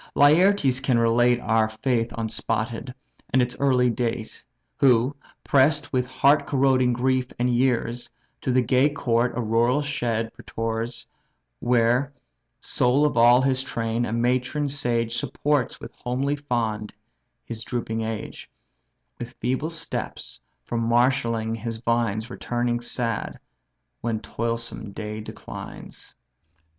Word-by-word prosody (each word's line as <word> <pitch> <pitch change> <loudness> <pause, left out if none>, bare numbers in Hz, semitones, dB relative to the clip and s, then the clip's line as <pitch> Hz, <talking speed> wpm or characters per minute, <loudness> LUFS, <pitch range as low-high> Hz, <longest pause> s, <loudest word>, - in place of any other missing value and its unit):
Laertes 145 -2 +4
can 135 -2 +1
relate 120 +1 +3
Our 110 0 +2
faith 115 +1 -1
unspotted, 115 +2 -3 0.4
and 130 - +3
its 125 -1 +1
early 125 -3 +3
date; 115 -1 -3 0.4
Who, 130 +1 +4 0.3
press'd 145 +2 +3
with 125 -1 +1
heart 135 +3 +3
corroding 130 -2 +3
grief 130 +1 +1
and 125 - +1
years, 120 -1 0 0.3
To 130 - -1
the 125 0 +3
gay 130 +4 +3
court 125 -4 0
a - - 0
rural 120 +5 +2
shed 115 -5 -2
prefers, 115 +1 -4 0.5
Where, 120 +3 +2 0.5
sole 130 +4 +2
of 150 - 0
all 120 +2 +6
his 130 -1 +2
train, 115 -2 -2
a - - -4
matron 125 +5 0
sage 120 -4 0
Supports 145 +2 -1
with 115 - -10
homely 135 +4 -2
fond 115 -7 -2 0.5
his 115 -1 -6
drooping 115 -2 -3
age, 110 -1 -5 0.7
With 120 +1 -7
feeble 130 +6 -1
steps 165 -1 -5 0.2
from 115 - -3
marshalling 115 -1 +1
his 115 0 -4
vines 115 -1 -1
Returning 120 0 -1
sad, 115 -2 -3 0.6
when 115 -2 -1
toilsome 115 -2 -4
day 105 +1 -5
declines. - - -10
120 Hz, 125 wpm, -24 LUFS, 115-130 Hz, 0.7 s, all